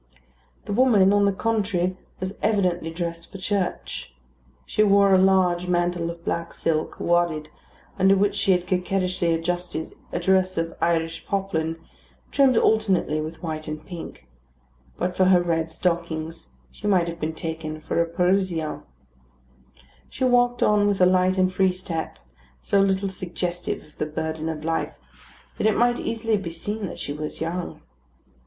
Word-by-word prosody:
The - - -3
woman, 210 -5 +5
on 205 0 +4
the 200 - +3
contrary, 195 -4 0 0.2
was 185 +2 -4
evidently 180 -6 +1
dressed 170 0 -5
for 195 - -7
church. 185 - -3 0.5
She - - 0
wore 200 -1 +5
a - - +7
large 185 -2 +3
mantle 175 -1 0
of 170 0 -9
black 170 0 -2
silk, 155 -1 -1
wadded, 170 -3 +1 0.5
under 190 +1 +5
which 200 +1 +2
she 195 - +2
had 180 -1 +2
coquettishly 180 -1 0
adjusted 170 0 -2 0.2
a - - -2
dress 185 +1 +2
of 165 0 -2
Irish 165 -1 0
poplin, 165 -5 -1 0.5
trimmed 265 -4 +4
alternately 195 -10 +2
with 160 +3 -7
white 155 -1 -4
and 155 0 -6
pink; 170 - -9 0.7
but 180 0 -2
for 185 - +3
her 185 -1 +6
red 165 -2 0
stockings, 165 -1 -2 0.2
she 210 - -6
might 180 -4 +3
have 170 0 -5
been 160 0 -3
taken 160 -1 -5
for 155 +2 -1
a 170 - +1
Parisian. 180 -2 0 1.3
She 260 - -5
walked 245 -1 +3
on 210 -1 +4
with 200 -1 +1
a 180 - +6
light 185 +1 +3
and 185 0 +2
free 190 0 +3
step, 175 -3 -5 0.5
so 200 - +3
little 195 0 +1
suggestive 180 -1 -3
of 150 - -21
the 155 - -2
burden 160 +1 -3
of 155 -1 -5
life 165 0 -1 0.6
that - - +3
it 220 - +2
might 240 0 +3
easily 225 -1 0
be 195 -4 -5
seen 205 +5 -4
that - - -8
she 145 - -4
was 150 +1 -5
young. 170 - -4
180 Hz, 160 wpm, -24 LUFS, 165-195 Hz, 1.3 s, a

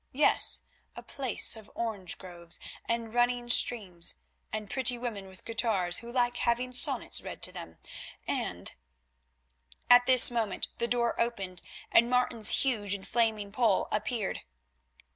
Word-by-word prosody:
Yes, 290 +4 +3 0.3
a - - -10
place 265 -4 +2
of 220 -2 -11
orange 210 -6 -4
groves, 175 -2 -11 0.3
and 230 -1 -3
running 240 0 0
streams, 190 -10 +1 0.4
and 215 -1 -5
pretty 250 +2 +2
women 225 -5 -6
with 190 -1 -13
guitars, 210 -6 0
who 235 0 -9
like 245 -1 0
having 245 +1 -1
sonnets 250 - +1
read - - -9
to - - -1
them, 80 0 -10 0.5
and——" - - -3 1.2
At 245 0 +7
this 255 -1 +7
moment 225 -5 -3
the 235 - -1
door 235 -1 -1
opened 195 -7 -4 0.3
and 235 +1 +4
Martin's 250 -2 +5
huge 210 -7 -1
and 190 - -10
flaming 220 -3 -1
poll 220 -3 +1
appeared. 215 0 -3
230 Hz, 140 wpm, -29 LUFS, 200-245 Hz, 1.2 s, At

